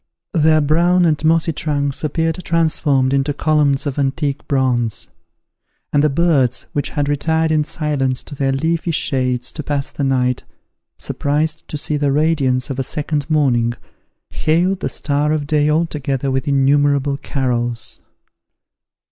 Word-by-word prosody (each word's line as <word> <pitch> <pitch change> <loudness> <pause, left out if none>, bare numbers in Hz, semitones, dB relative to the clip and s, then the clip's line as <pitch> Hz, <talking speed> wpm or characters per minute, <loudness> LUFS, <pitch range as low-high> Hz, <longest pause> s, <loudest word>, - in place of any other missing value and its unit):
Their 155 -2 +4
brown 175 +4 +3
and 155 -2 +1
mossy 165 +1 +2
trunks 145 -2 -2
appeared 165 +3 -1
transformed 150 -5 +1
into 140 +1 0
columns 150 -3 +1
of 145 0 -3
antique 140 +1 -1
bronze; 125 -6 0 0.8
and 145 0 +3
the 150 - +4
birds, 140 -5 +1
which 145 - -1
had 145 -1 -2
retired 160 +2 +1
in 155 -1 +2
silence 145 -5 -1
to - - -10
their 135 -1 0
leafy 160 +5 -1
shades 130 -5 -1
to 155 - -6
pass 145 -1 -3
the 140 - -4
night, 125 -2 +1 0.5
surprised 150 +2 -2
to 150 - -4
see 150 +1 -1
the 145 -1 +1
radiance 140 -3 +1
of 135 - -4
a - - 0
second 150 +1 -3
morning, 125 -6 +2 0.6
hailed 180 +4 +1
the - - -2
star 150 +1 0
of 150 -2 -1
day 150 0 +2
all 160 +3 +2
together 140 -3 -2
with 135 +1 -2
innumerable 140 0 +2
carols. 120 -5 -2
145 Hz, 150 wpm, -18 LUFS, 135-155 Hz, 0.8 s, Their